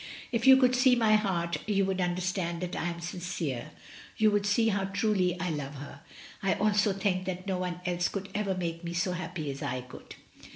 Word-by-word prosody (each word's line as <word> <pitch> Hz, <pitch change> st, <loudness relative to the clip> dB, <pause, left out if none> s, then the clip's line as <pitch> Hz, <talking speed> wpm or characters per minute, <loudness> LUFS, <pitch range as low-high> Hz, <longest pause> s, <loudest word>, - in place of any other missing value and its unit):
If 235 Hz, 0 st, 0 dB
you 265 Hz, 0 st, +10 dB
could 255 Hz, -1 st, +4 dB
see 255 Hz, 0 st, +5 dB
my 225 Hz, -3 st, +3 dB
heart 175 Hz, -5 st, 0 dB
you 200 Hz, -2 st, +2 dB
would 190 Hz, -1 st, -1 dB
understand 180 Hz, -1 st, -1 dB
that 180 Hz, -, -4 dB
I 175 Hz, -, -2 dB
am 170 Hz, 0 st, -5 dB
sincere, 170 Hz, -7 st, -4 dB, 0.5 s
you 215 Hz, -1 st, +4 dB
would 205 Hz, 0 st, +1 dB
see 225 Hz, +2 st, +3 dB
how 195 Hz, -2 st, 0 dB
truly 190 Hz, -2 st, +1 dB
I 180 Hz, -2 st, -1 dB
love 145 Hz, -2 st, -4 dB
her. 140 Hz, 0 st, -9 dB, 0.4 s
I 195 Hz, -1 st, +2 dB
also 210 Hz, 0 st, +2 dB
think 190 Hz, -1 st, -1 dB
that 185 Hz, 0 st, -4 dB
no 190 Hz, -2 st, -1 dB
one 180 Hz, -1 st, -3 dB
else 175 Hz, -1 st, +1 dB
could 195 Hz, -1 st, -5 dB
ever 200 Hz, -2 st, -1 dB
make 170 Hz, -2 st, -3 dB
her 170 Hz, -1 st, -5 dB
so 180 Hz, +2 st, 0 dB
happy 175 Hz, -4 st, -4 dB
as 135 Hz, -, -8 dB
I 125 Hz, 0 st, -2 dB
could. 125 Hz, +1 st, -12 dB
185 Hz, 210 wpm, -29 LUFS, 170-205 Hz, 0.5 s, you